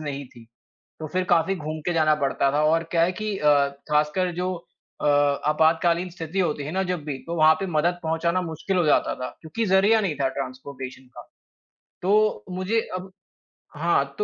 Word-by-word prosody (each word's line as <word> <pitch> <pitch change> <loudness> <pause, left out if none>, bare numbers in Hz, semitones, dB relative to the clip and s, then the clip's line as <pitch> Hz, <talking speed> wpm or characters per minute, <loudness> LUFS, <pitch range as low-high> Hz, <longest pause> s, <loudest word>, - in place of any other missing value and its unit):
नहीं 140 -2 -5
थी। 120 -2 -16 0.5
तो 155 - -5
फिर 185 0 +1
काफ़ी 175 +3 +3
घूम 155 -1 -5
के 175 - 0
जाना 155 -2 +3
पड़ता 140 0 +1
था। 150 +2 +1
और 165 +2 +3
क्या 170 - +2
है 175 - +2
कि 215 +1 -3
अ, 150 -1 +4 0.4
खासकर 150 +5 +1
जो 180 +1 -1 0.5
अ, - - -2
आपातकालीन 160 +4 +2
स्थिति 170 +1 -5
होती 155 -5 0
है 145 - -5
ना 190 +2 0
जब 180 -4 -3
भी 140 -3 -3
तो 170 - -3
वहाँ 155 0 +6
पे 195 - -2
मदद 175 +3 +1
पहुँचाना 165 +3 0
मुश्किल 170 +3 -3
हो 175 - +2
जाता 150 - +2
था, 125 0 -5
क्योंकि 170 +8 -3
जरिया 200 +3 +4
नहीं 185 -7 -1
था 135 - +3
ट्रांसपोर्टेशन 130 -1 -7
का। - - -11 0.8
तो 205 - +2
मुझे 185 +5 0 0.2
अब 185 +1 -8 0.7
हाँ, 140 -4 +1
तो 210 - +2
165 Hz, 190 wpm, -24 LUFS, 150-185 Hz, 0.8 s, वहाँ